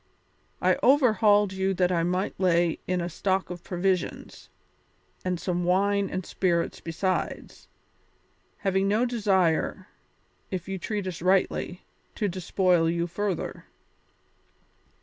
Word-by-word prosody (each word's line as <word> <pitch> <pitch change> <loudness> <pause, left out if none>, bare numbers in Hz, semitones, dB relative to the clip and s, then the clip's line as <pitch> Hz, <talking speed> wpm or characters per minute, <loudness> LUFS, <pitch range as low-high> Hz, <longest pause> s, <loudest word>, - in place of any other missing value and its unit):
I - - +3
overhauled 215 -7 +4
you 190 0 0
that 180 0 +2
I 170 -2 +2
might 180 +3 -1
lay 175 -3 +2
in 180 -1 0
a 170 - -2
stock 190 +2 -1
of 175 -1 -7
provisions, 180 0 -2 0.7
and 180 -2 -1
some 175 -1 -1
wine 200 +2 +2
and 185 -1 -4
spirits 170 -3 0
besides, 185 +3 -3 0.9
having 195 0 +1
no 215 +5 +2
desire, 195 -9 +1 0.6
if 185 -1 -4
you 195 -1 -4
treat 205 +1 -3
us 180 -3 -5
rightly, 185 0 0 0.3
to 210 - 0
despoil 180 -2 +1
you 170 0 0
further. 190 +1 -3
185 Hz, 120 wpm, -26 LUFS, 175-195 Hz, 0.9 s, overhauled